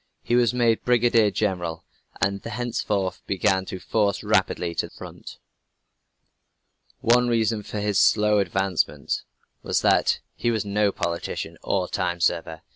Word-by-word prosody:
He - - -2
was 120 -3 +4
made 120 -2 +1
Brigadier 120 -3 +4
General, 90 -5 -2 0.3
and 100 0 0
thenceforth 110 -5 -2
began 95 -1 +1
to 95 - -6
forge 105 +1 0
rapidly 85 - +1
to - - -2
the - - -20
front. - - -10 1.6
One 125 +1 +4
reason 115 -2 +1
for 105 +1 -6
his 105 -1 +1
slow 105 -1 +4
advancement 95 -2 -1 0.4
was - - 0
that - - +3
he 120 - -1
was 110 -3 0
no 100 0 +1
politician 85 -2 -4
or 95 -2 0
time 90 -2 -2
server. 80 -1 0
100 Hz, 135 wpm, -24 LUFS, 95-115 Hz, 1.6 s, was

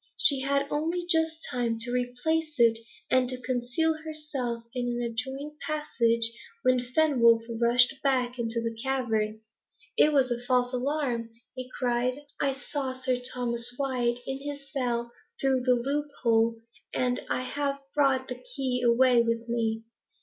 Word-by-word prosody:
She 280 -3 +7
had 280 +1 +1
only 330 +4 -1
just 320 -2 +1
time 240 -2 0
to 245 +1 +1
replace 275 +6 -1
it, 230 -2 +5 0.3
and 255 -1 +3
to 255 -1 -2
conceal 250 +6 0
herself 295 -7 -4
in 245 -1 -2
an 240 0 -2
adjoining 265 +6 -4
passage, 235 -7 0 0.3
when 255 0 +4
Fenwolf 245 -3 +3 0.2
rushed 250 +3 +4
back 255 -2 +1
into 230 0 -1
the 230 0 -3
cavern. 225 -5 -1 0.5
"It 305 - +5
was 270 -4 +3
a 240 0 -1
false 250 0 +1
alarm," 250 -3 -1 0.2
he 255 -1 -7
cried. 250 0 0 0.2
"I 275 -1 +1
saw 270 -1 -4
Sir 255 -1 0
Thomas 245 -1 0
Wyat 250 -3 0
in 270 0 -3
his 285 -1 -7
cell 240 -4 -1 0.3
through 270 -1 +2
the 250 -1 +5
loop 280 +5 -1 0.2
hole, 230 -1 +3 0.4
and 250 -1 +1
I 255 - 0
have 280 +1 -2
brought 270 -3 +2
the 250 - -7
key 255 -2 -1
away 245 0 +5
with 230 0 -1
me. 225 -1 -1
250 Hz, 150 wpm, -28 LUFS, 235-275 Hz, 0.5 s, She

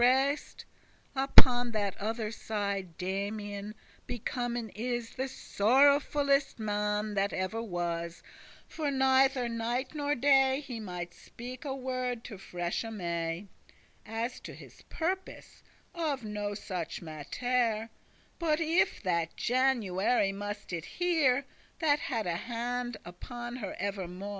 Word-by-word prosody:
*expected 265 +3 +6
burst 300 - -10 0.5
Upon 250 -2 +6
that 200 -2 0
other 220 +1 -2
side 200 -6 -3
Damian 205 +2 -3 0.3
Becomen 240 -1 -2
is 240 +1 -2
the 260 - -2
sorrowfullest 280 +4 +3
man 210 -1 0
That 200 0 +1
ever 185 +5 -1
was; 170 -4 -3 0.4
for 305 -3 -2
neither 265 -1 +4
night 235 +3 -1
nor 290 -1 0
day 270 0 +5
He 260 -5 -6
mighte 180 -4 -5
speak 250 +1 -9
a 270 -2 -2
word 255 -2 -2
to 205 -5 -8
freshe 175 +5 -3
May, 170 -2 -2 0.6
As 225 +3 -3
to - - -9
his - - -13
purpose, 370 +3 -3 0.3
of 300 -7 -1
no 210 -1 -3
such 180 -5 -4
mattere, 225 - 0 0.5
*But 315 -2 +2
if* 330 - +2
that 170 -3 0
January 235 -5 +2
must 205 -1 -5
it 165 -2 -2
hear, 335 -7 +4
*unless* 275 +2 -2 0.3
That 300 -3 +3
had 230 -8 -1
a 170 -1 0
hand 240 +1 -2
upon 240 +7 -6
her 205 -6 -4
evermo'. 195 -1 -3
230 Hz, 125 wpm, -31 LUFS, 200-265 Hz, 0.6 s, expected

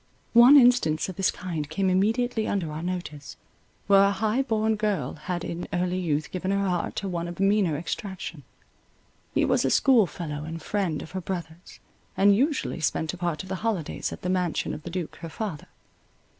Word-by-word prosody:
One 240 +5 +9
instance 240 - +4
of 185 - -6
this 195 -1 +2
kind 165 -5 -4
came 190 +5 0
immediately 220 +5 +1
under 175 -6 -1
our 155 +1 -5
notice, 165 -5 -5 0.5
where 195 0 +6
a - - +4
high 220 +5 0
born 220 -4 +1
girl 205 -11 -1
had 175 +2 -4
in 170 +1 -5
early 180 +1 0
youth 155 -4 -1
given 185 +1 -3
her 200 0 +1
heart 175 -2 -1
to 200 - -3
one 170 -2 -3
of 175 +1 -8
meaner 195 -5 +2
extraction. 175 -1 -5 0.9
He - - +3
was - - +2
a - - +2
schoolfellow 175 - +2
and 165 +1 -6
friend 175 -2 -2
of - - -11
her 185 - -4
brother's, 170 -1 -7 0.4
and 200 +1 +5
usually 275 - 0
spent 160 +1 -1
a - - -7
part 170 -2 -2
of 190 - -11
the 190 - -2
holidays 210 -9 -2
at - - -9
the 180 - -1
mansion 180 -3 0
of - - -6
the 175 - -7
duke 175 -2 -5
her 165 - -7
father. 185 -4 -5
185 Hz, 190 wpm, -26 LUFS, 165-205 Hz, 0.9 s, One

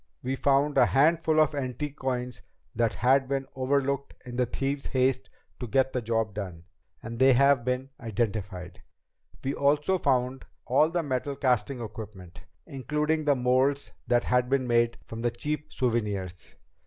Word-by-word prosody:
We 130 +2 -1
found 140 +2 +2
a - - +7
handful 155 +2 +3
of 155 -1 +4
the 145 - -3
antique 135 +2 -4
coins 125 -2 -3 0.3
that 115 -1 +1
had 130 +2 +3
been 135 0 -1
overlooked 140 +1 -1
in 120 -1 -7
the 125 0 +1
thieves' 135 +3 -3
haste 130 -5 0 0.3
to 125 - -4
get 130 +4 +1
the 125 - -1
job 115 -2 -1
done, 90 -5 -6 0.4
and 115 0 -6
they've 130 -1 +6 0.3
been 125 +2 -2
identified. 105 -5 -3 0.6
We 135 - -1
also 150 +7 +2
found 130 -2 0 0.2
all 140 +5 +3
the 170 0 -1
metal 140 0 -2
casting 130 -2 0
equipment, 105 -5 -9 0.2
including 150 +3 -1
the 145 -1 +4
molds 130 +3 +1 0.2
that 120 -1 +3
had 125 0 +1
been 135 -1 +1
made 120 -1 +2
from 115 0 -7
the 120 - +1
cheap 150 +6 -4
souvenirs. 105 -8 -2
130 Hz, 155 wpm, -27 LUFS, 115-140 Hz, 0.6 s, a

